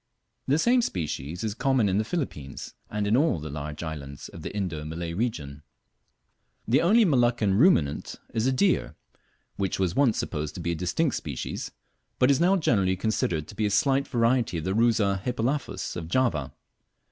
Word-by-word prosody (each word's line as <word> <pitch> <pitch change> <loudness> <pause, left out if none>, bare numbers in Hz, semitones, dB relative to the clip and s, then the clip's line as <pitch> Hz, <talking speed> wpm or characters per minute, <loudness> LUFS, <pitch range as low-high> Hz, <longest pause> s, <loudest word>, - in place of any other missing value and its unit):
The 140 - +3
same 245 +8 +4
species 80 - -3
is 110 -2 -1
common 130 -1 +2
in 95 +1 +1
the - - +1
Philippines 110 - -5 0.2
and 105 -1 -2
in 105 +2 +3
all 140 - +2
the 75 0 -6
large 75 +2 -5
islands 70 -4 -7
of - - -10
the - - -5
Indo 90 -7 -3
Malay 85 +2 -5
region. 80 - -3 1.1
The 120 +5 +4
only 215 +6 +5
Moluccan 120 - +2
ruminant 95 - +3 0.2
is 115 +2 +1
a - - +3
deer, 180 +9 +1 0.6
which 95 -2 -1
was 90 -2 0
once 135 -6 +3
supposed 75 -2 -3
to - - -6
be 85 0 -2
a - - -1
distinct 90 - 0
species, 70 -5 -5 0.5
but 125 +2 +4
is 135 - +3
now 185 +3 +4
generally 100 - +2
considered 90 -6 -1
to - - -10
be 105 +1 +1
a - - -1
slight 135 +6 +2
variety 115 -6 +1
of 80 - -4
the 95 +2 -1
Rusa 105 -4 +2
hippelaphus 125 -4 -2
of 85 -2 -5
Java. 85 - 0
105 Hz, 180 wpm, -26 LUFS, 85-130 Hz, 1.1 s, only